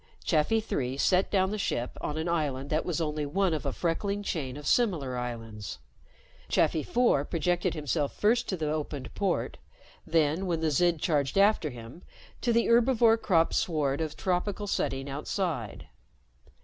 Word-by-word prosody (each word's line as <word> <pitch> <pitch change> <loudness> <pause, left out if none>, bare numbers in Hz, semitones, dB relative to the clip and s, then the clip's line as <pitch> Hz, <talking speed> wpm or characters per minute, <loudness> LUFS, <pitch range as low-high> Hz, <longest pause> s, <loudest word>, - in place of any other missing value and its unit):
Chafi 165 +8 +2
Three 130 - -2
set 185 +6 +2
down 190 -1 +2
the 215 - -3
ship 120 -10 -2
on 150 - -3
an 160 +2 -2
island 145 -5 -1
that 155 +1 +1
was 175 -2 -1
only 150 -2 -1
one 180 +5 +1
of 150 -2 -2
a - - 0
freckling 200 +7 -2
chain 140 -8 -3
of 150 - -9
similar 160 - +1
islands. 115 - -5 0.7
Chafi 155 - +2
Four 235 - +2
projected 175 +2 0
himself 150 -1 -1
first 230 +3 +2
to 185 - -1
the 155 -2 -1
opened 150 -3 -4
port; 195 -3 -1 0.5
then, 165 +3 +1
when 170 -2 0
the 160 -1 0
Zid 170 +1 +2
charged 145 -1 0
after 200 -5 +4
him, 120 +5 -10 0.4
to 240 - +1
the 235 0 +3
herbivore 235 -1 +4
cropped 165 -4 +2
sward 150 -4 0
of 155 -2 -4
tropical 190 +3 -1
setting 135 -8 -1
outside. 140 - -3
160 Hz, 160 wpm, -28 LUFS, 140-190 Hz, 0.7 s, after